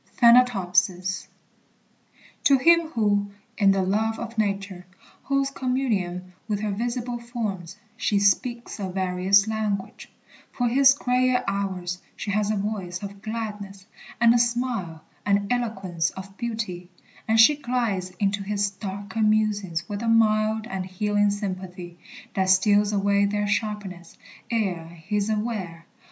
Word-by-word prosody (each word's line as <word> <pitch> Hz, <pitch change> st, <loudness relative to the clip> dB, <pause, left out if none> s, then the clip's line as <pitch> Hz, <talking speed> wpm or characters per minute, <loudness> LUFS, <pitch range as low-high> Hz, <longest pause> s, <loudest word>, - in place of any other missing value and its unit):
THANATOPSIS. 195 Hz, -6 st, +3 dB, 1.2 s
To 275 Hz, -, +6 dB
him 335 Hz, +4 st, +5 dB
who, 205 Hz, -5 st, 0 dB, 0.2 s
in 200 Hz, -2 st, +4 dB
the 195 Hz, -1 st, +3 dB
love 220 Hz, +4 st, 0 dB
of 235 Hz, 0 st, -6 dB
Nature, 200 Hz, -3 st, -2 dB, 0.4 s
holds 275 Hz, 0 st, 0 dB
Communion 205 Hz, -10 st, -2 dB
with 210 Hz, -2 st, -2 dB
her 215 Hz, -1 st, -1 dB
visible 240 Hz, +3 st, -3 dB
forms, 210 Hz, -7 st, -5 dB, 0.2 s
she 215 Hz, -2 st, 0 dB
speaks 235 Hz, +4 st, +1 dB
A 195 Hz, -2 st, -3 dB
various 190 Hz, +2 st, +2 dB
language: 215 Hz, -3 st, -3 dB, 0.4 s
for 245 Hz, -, 0 dB
his 270 Hz, +3 st, +5 dB
gayer 250 Hz, -1 st, +1 dB
hours 185 Hz, -3 st, -2 dB, 0.2 s
She 205 Hz, -, -4 dB
has 210 Hz, 0 st, 0 dB
a 215 Hz, -, +1 dB
voice 195 Hz, -3 st, -4 dB
of 200 Hz, 0 st, -8 dB
gladness, 210 Hz, -3 st, -6 dB, 0.3 s
and 235 Hz, 0 st, +6 dB
a 240 Hz, -, +3 dB
smile 235 Hz, -9 st, -1 dB, 0.2 s
And 200 Hz, +2 st, +1 dB
eloquence 190 Hz, -9 st, -1 dB
of 195 Hz, +1 st, -10 dB
beauty; 210 Hz, -7 st, -4 dB, 0.4 s
and 225 Hz, 0 st, +3 dB
she 260 Hz, +7 st, +8 dB
glides 240 Hz, -9 st, -1 dB
Into 200 Hz, 0 st, 0 dB
his 200 Hz, 0 st, -1 dB
darker 200 Hz, +2 st, -5 dB
musings 205 Hz, -5 st, +1 dB
with 205 Hz, 0 st, -4 dB
a 235 Hz, -, -2 dB
mild 220 Hz, -1 st, +3 dB
And 190 Hz, -5 st, -4 dB
healing 205 Hz, +2 st, +1 dB
sympathy, 185 Hz, -3 st, -5 dB, 0.3 s
that 190 Hz, -1 st, 0 dB
steals 205 Hz, +2 st, +4 dB
away 200 Hz, 0 st, +2 dB
Their 205 Hz, +1 st, 0 dB
sharpness, 205 Hz, -4 st, -3 dB, 0.3 s
ere 190 Hz, -8 st, -1 dB
he 170 Hz, +5 st, -4 dB
is 205 Hz, +1 st, 0 dB
aware. 210 Hz, -7 st, -3 dB
205 Hz, 135 wpm, -25 LUFS, 190-225 Hz, 1.2 s, she